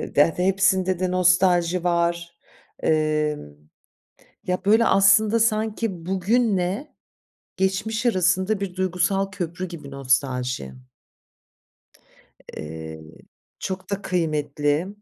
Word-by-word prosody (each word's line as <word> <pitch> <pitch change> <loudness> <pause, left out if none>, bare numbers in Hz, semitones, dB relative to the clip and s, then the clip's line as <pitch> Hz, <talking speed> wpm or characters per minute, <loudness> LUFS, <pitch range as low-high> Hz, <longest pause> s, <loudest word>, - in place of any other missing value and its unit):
de 145 +3 +4
de 180 - 0
hepsinde 190 -1 +2
de 185 -1 -1
nostalji 180 -1 +3
var. 170 0 -1 0.5
Emm, 150 - 0 1.0
ya, 180 +1 -2
böyle, 220 +3 +4
aslında 205 +3 +4
sanki 215 -5 -1
bugünle 195 +4 0 0.6
geçmiş 215 +5 -1
arasında 185 0 +1
bir 190 -2 -5
duygusal 185 +1 0
köprü 180 -1 -5
gibi 155 -5 -9
nostalji. 130 - -1 1.8
Eee, 80 0 -8 0.6
çok 190 0 -5
da 200 0 -2
kıymetli. 150 -2 -1
180 Hz, 90 wpm, -23 LUFS, 155-195 Hz, 1.8 s, de